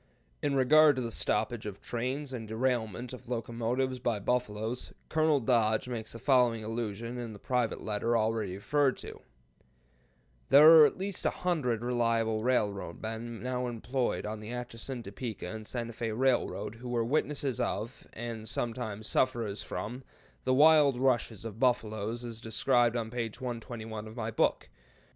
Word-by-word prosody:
In 145 -1 0
regard 150 +3 +6
to 130 - -2
the 115 - -3
stoppage - - 0
of - - -7
trains 130 +4 -3
and 115 -3 -5
derailment 120 0 -1
of 125 -1 -10
locomotives 120 +2 -1
by 120 -3 0
buffaloes, 115 +1 -2 0.2
Colonel 155 -2 +3
Dodge 115 -3 +2
makes 115 -3 -5
the - - -7
following 120 -3 +3
allusion 115 +1 -4
in 115 -2 -5
the - - -9
private 125 +1 -1
letter 110 +2 0
already 110 -4 0
referred 135 +6 +1
to: - - -9 1.3
"There 150 +3 +9
are - - +10
at - - -6
least 195 0 -2
a - - +3 0.2
hundred 125 -11 +1
reliable 115 -2 +1
railroad 105 -7 0
men 115 +1 -5
now 125 0 -1
employed 120 +1 -2
on 105 0 -4
the 105 +1 -8
Atchison, 120 +1 -5
Topeka 105 0 -6
and 110 +3 -6
Santa 120 -2 -4
Fé 110 -1 -3
Railroad 130 -4 +1
who 125 +1 -8
were 120 -2 0
witnesses 140 -1 0
of, 115 0 -3
and 115 -1 -6
sometimes 110 -3 -3
sufferers 115 -5 0
from, 115 +8 -5 0.4
the 130 - +3
wild 150 -2 +6
rushes 120 -5 +1
of 110 -1 -7
buffalo 110 -5 +1
as 115 -1 -6
described 120 +1 +2
on 110 -1 -3
page 115 -3 -4
121 115 -3 -5
of 110 - -10
my 115 -2 -3
book. - - +1
120 Hz, 155 wpm, -30 LUFS, 110-130 Hz, 1.3 s, are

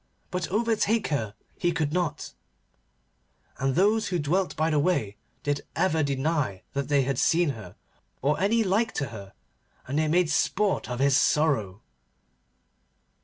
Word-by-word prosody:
But 180 -2 -2
overtake 225 +1 +1
her 110 -8 -2 0.2
he 175 - +2
could 155 -3 -1
not, 170 -4 -2 1.3
and 135 0 0
those 210 +5 +3
who 180 - -1
dwelt 175 +5 0
by 160 +2 +1
the 150 - +2
way 140 - 0 0.3
did 145 0 -1
ever 160 -4 +2
deny 140 - -1
that 140 0 -2
they 145 -2 +3
had 135 -1 -1
seen 170 -1 +3
her, 110 -9 -7 0.4
or 145 +3 +1
any 220 +5 +2
like 215 +4 +1
to 140 - -2
her, 100 -3 -10 0.5
and 140 +4 -1
they 155 - +1
made 170 +1 +2
sport 200 0 +1
of 125 - -3
his 135 +1 +3
sorrow. 135 -12 +1
155 Hz, 150 wpm, -26 LUFS, 135-180 Hz, 1.3 s, those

